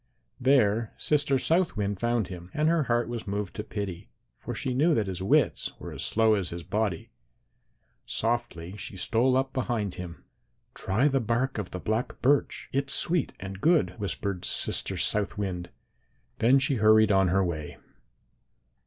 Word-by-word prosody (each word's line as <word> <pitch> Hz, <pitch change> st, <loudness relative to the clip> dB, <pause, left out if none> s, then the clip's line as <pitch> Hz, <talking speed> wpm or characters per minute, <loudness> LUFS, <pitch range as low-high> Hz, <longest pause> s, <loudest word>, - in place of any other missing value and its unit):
There 115 Hz, -4 st, +2 dB
Sister 145 Hz, -2 st, +2 dB
South 165 Hz, -, +1 dB
Wind 100 Hz, -2 st, -2 dB
found 120 Hz, -4 st, 0 dB
him, 90 Hz, -1 st, -9 dB
and 150 Hz, +1 st, +2 dB
her 165 Hz, -3 st, +2 dB
heart 120 Hz, 0 st, +1 dB
was 120 Hz, -2 st, -5 dB
moved 100 Hz, -1 st, -3 dB
to 105 Hz, -, -3 dB
pity, 100 Hz, -4 st, -6 dB, 0.3 s
for -, -, -6 dB
she 130 Hz, -, -2 dB
knew 155 Hz, +5 st, +3 dB
that 110 Hz, -, +1 dB
his 95 Hz, -2 st, -5 dB
wits 95 Hz, -, +1 dB
were -, -, -8 dB
as -, -, -6 dB
slow 110 Hz, 0 st, +3 dB
as 100 Hz, -4 st, 0 dB
his 85 Hz, 0 st, -6 dB
body. 100 Hz, -1 st, -2 dB, 1.0 s
Softly 115 Hz, -6 st, -2 dB
she 95 Hz, 0 st, -7 dB
stole 125 Hz, +7 st, +2 dB
up 135 Hz, 0 st, -1 dB
behind 115 Hz, -7 st, -2 dB
him. 85 Hz, -6 st, -9 dB, 0.5 s
"'Try 110 Hz, +9 st, +1 dB
the 135 Hz, -2 st, +2 dB
bark 120 Hz, +2 st, -1 dB
of 100 Hz, -, -4 dB
the 90 Hz, -, -6 dB
black 110 Hz, +6 st, -2 dB
birch; 140 Hz, +2 st, +1 dB
it's 140 Hz, 0 st, 0 dB
sweet 170 Hz, -3 st, +1 dB
and 95 Hz, 0 st, -7 dB
good,' 165 Hz, -1 st, +3 dB
whispered 100 Hz, -2 st, -2 dB
Sister -, -, +1 dB
South 105 Hz, -1 st, 0 dB
Wind. 90 Hz, -4 st, -3 dB, 0.7 s
Then 125 Hz, +4 st, +5 dB
she 135 Hz, 0 st, +1 dB
hurried 110 Hz, 0 st, +5 dB
on 95 Hz, -1 st, +4 dB
her 95 Hz, +2 st, +2 dB
way. 80 Hz, -4 st, -5 dB
110 Hz, 165 wpm, -27 LUFS, 95-130 Hz, 1.0 s, Then